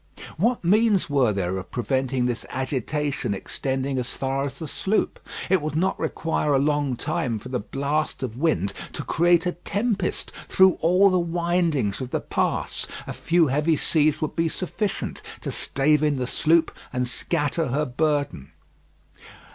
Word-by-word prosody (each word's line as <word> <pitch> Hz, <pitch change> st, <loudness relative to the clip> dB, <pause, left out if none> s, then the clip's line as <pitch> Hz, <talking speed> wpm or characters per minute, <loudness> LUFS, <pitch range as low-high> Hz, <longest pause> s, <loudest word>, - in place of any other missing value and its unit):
What 230 Hz, +7 st, +1 dB
means 205 Hz, -1 st, +3 dB
were 135 Hz, -6 st, +3 dB
there 95 Hz, -1 st, -1 dB
of 95 Hz, -, -9 dB
preventing 130 Hz, 0 st, 0 dB
this 120 Hz, -2 st, -1 dB
agitation 130 Hz, -2 st, -2 dB
extending 135 Hz, +5 st, -2 dB
as 125 Hz, -, -3 dB
far 135 Hz, +1 st, -2 dB
as 140 Hz, -, -6 dB
the 160 Hz, -, -6 dB
sloop? 195 Hz, +8 st, -1 dB, 0.3 s
It 185 Hz, -2 st, +3 dB
would 155 Hz, 0 st, -3 dB
not 185 Hz, +4 st, +1 dB
require 160 Hz, -2 st, 0 dB
a -, -, +5 dB
long 145 Hz, -1 st, +1 dB
time 135 Hz, -2 st, -1 dB
for 125 Hz, -, -9 dB
the 125 Hz, -1 st, -1 dB
blast 140 Hz, +7 st, -2 dB
of 120 Hz, -4 st, -4 dB
wind 120 Hz, -, +1 dB, 0.2 s
to -, -, -4 dB
create 175 Hz, +1 st, +3 dB
a 180 Hz, -, +1 dB
tempest 200 Hz, +5 st, -1 dB, 0.2 s
through 190 Hz, -1 st, +5 dB
all 185 Hz, +4 st, +5 dB
the 185 Hz, -, +3 dB
windings 170 Hz, -, 0 dB
of 130 Hz, -, -4 dB
the -, -, -1 dB
pass. -, -, -1 dB, 0.2 s
A -, -, -5 dB
few 170 Hz, 0 st, +3 dB
heavy 150 Hz, +4 st, +2 dB
seas 155 Hz, 0 st, +2 dB
would 155 Hz, -, -3 dB
be 165 Hz, 0 st, +1 dB
sufficient 195 Hz, +4 st, -3 dB, 0.2 s
to -, -, -3 dB
stave 150 Hz, +2 st, +2 dB
in 150 Hz, -1 st, +2 dB
the 130 Hz, -2 st, -1 dB
sloop 160 Hz, +6 st, +2 dB, 0.2 s
and 125 Hz, 0 st, -1 dB
scatter 150 Hz, +4 st, -1 dB
her 145 Hz, +4 st, 0 dB
burden. 145 Hz, -, -1 dB
150 Hz, 165 wpm, -24 LUFS, 130-170 Hz, 0.3 s, a